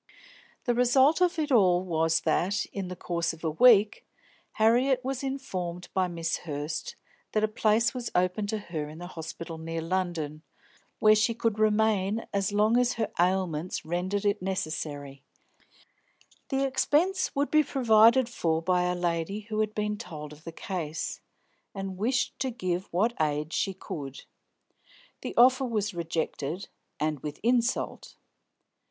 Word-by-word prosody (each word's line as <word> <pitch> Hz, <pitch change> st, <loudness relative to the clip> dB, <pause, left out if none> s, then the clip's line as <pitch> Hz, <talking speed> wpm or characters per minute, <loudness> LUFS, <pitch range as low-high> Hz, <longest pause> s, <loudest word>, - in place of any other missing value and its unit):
The 245 Hz, -, +2 dB
result 260 Hz, +7 st, +4 dB
of 360 Hz, -1 st, +3 dB
it 305 Hz, -2 st, -1 dB
all 185 Hz, -7 st, +4 dB
was 165 Hz, -2 st, +1 dB
that, 180 Hz, +5 st, +1 dB
in 195 Hz, -2 st, -4 dB
the 180 Hz, -, -6 dB
course 170 Hz, -1 st, -2 dB
of 165 Hz, -, -14 dB
a 160 Hz, -, 0 dB
week, 215 Hz, +3 st, +5 dB, 0.5 s
Harriet 250 Hz, +4 st, +3 dB
was 265 Hz, -1 st, -2 dB
informed 185 Hz, -11 st, -4 dB
by 185 Hz, -1 st, +2 dB
Miss 165 Hz, -2 st, -2 dB
Hurst 150 Hz, 0 st, -5 dB, 0.4 s
that 215 Hz, -, +1 dB
a -, -, +4 dB
place 220 Hz, +2 st, +2 dB
was 245 Hz, -3 st, -4 dB
open 185 Hz, +3 st, +1 dB
to 220 Hz, +1 st, -1 dB
her 160 Hz, -7 st, -5 dB
in 155 Hz, +2 st, -10 dB
a 175 Hz, -, -7 dB
hospital 165 Hz, -1 st, -7 dB
near 165 Hz, 0 st, -4 dB
London, 165 Hz, -3 st, -2 dB, 0.6 s
where 215 Hz, -1 st, +6 dB
she 220 Hz, +2 st, +2 dB
could 225 Hz, -2 st, -1 dB
remain 215 Hz, -1 st, +2 dB
as 200 Hz, 0 st, 0 dB
long 210 Hz, +3 st, +3 dB
as 245 Hz, 0 st, +2 dB
her 225 Hz, -2 st, -2 dB
ailments 180 Hz, -2 st, 0 dB
rendered 185 Hz, +5 st, -2 dB
it 200 Hz, -2 st, +1 dB
necessary; 150 Hz, -7 st, -4 dB, 1.3 s
the 270 Hz, 0 st, +1 dB
expense 295 Hz, +8 st, +1 dB
would 285 Hz, +1 st, 0 dB
be 310 Hz, -, +6 dB
provided 235 Hz, -3 st, +5 dB
for 165 Hz, -9 st, 0 dB
by 180 Hz, +1 st, +1 dB
a 180 Hz, 0 st, 0 dB
lady 175 Hz, +3 st, -2 dB
who 215 Hz, -1 st, -2 dB
had 215 Hz, 0 st, 0 dB
been 210 Hz, -1 st, -2 dB
told 150 Hz, -3 st, -8 dB
of 150 Hz, +2 st, -17 dB
the 165 Hz, -, -5 dB
case, 165 Hz, -3 st, -4 dB, 0.5 s
and 195 Hz, -1 st, -5 dB
wished 245 Hz, +3 st, 0 dB
to 265 Hz, -, 0 dB
give 185 Hz, -6 st, -3 dB
what 215 Hz, +7 st, +2 dB
aid 150 Hz, +1 st, -1 dB
she 195 Hz, -, 0 dB
could. 140 Hz, -7 st, -7 dB, 1.0 s
The -, -, -5 dB
offer 255 Hz, +2 st, +6 dB
was 210 Hz, -4 st, -1 dB
rejected, 165 Hz, 0 st, -3 dB, 0.3 s
and 155 Hz, -1 st, -1 dB
with 150 Hz, +2 st, -6 dB
insult. 240 Hz, +1 st, 0 dB
190 Hz, 155 wpm, -28 LUFS, 165-230 Hz, 1.3 s, where